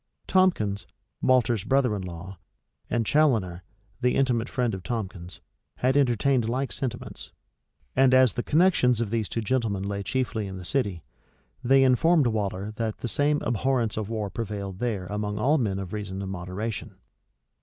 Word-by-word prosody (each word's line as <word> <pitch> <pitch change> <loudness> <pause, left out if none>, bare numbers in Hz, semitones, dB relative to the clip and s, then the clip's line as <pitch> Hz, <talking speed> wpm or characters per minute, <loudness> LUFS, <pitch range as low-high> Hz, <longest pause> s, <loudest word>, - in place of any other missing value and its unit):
Tomkins, 110 - +2 0.3
Waller's 120 -5 +3
brother 130 -5 +2
in 100 - -4
law, 90 +1 -8 0.5
and 115 -2 0
Chaloner, 110 - +2 0.4
the 125 0 +2
intimate 125 -3 +1
friend 120 -3 0
of 95 - -4
Tomkins, 95 -4 -5 0.3
had 130 +2 +1
entertained 130 -2 +2
like 130 +3 -1
sentiments: 120 -3 -5 0.6
and 130 0 +5
as 130 -2 +5
the 120 - -2
connections 150 - +3
of 115 -3 -2
these 115 -3 -1
two 115 - -2
gentlemen 110 -4 0
lay 100 0 -3
chiefly 115 -2 -2
in 95 -1 -6
the 90 - -8
city, 100 - -1 0.6
they 135 +2 +5
informed 145 +4 +4
Waller 105 -3 -1
that 110 -2 -2
the - - -2
same 145 +5 +1
abhorrence 120 -1 0
of 110 -1 -3
war 105 -3 -3
prevailed 100 -3 -5
there 110 -6 -2
among 105 +2 -3
all 145 +8 +3
men 100 -6 0
of 95 -1 -6
reason 100 -2 -4
and 95 - -4
moderation. 95 +4 -5
115 Hz, 160 wpm, -26 LUFS, 100-130 Hz, 0.6 s, and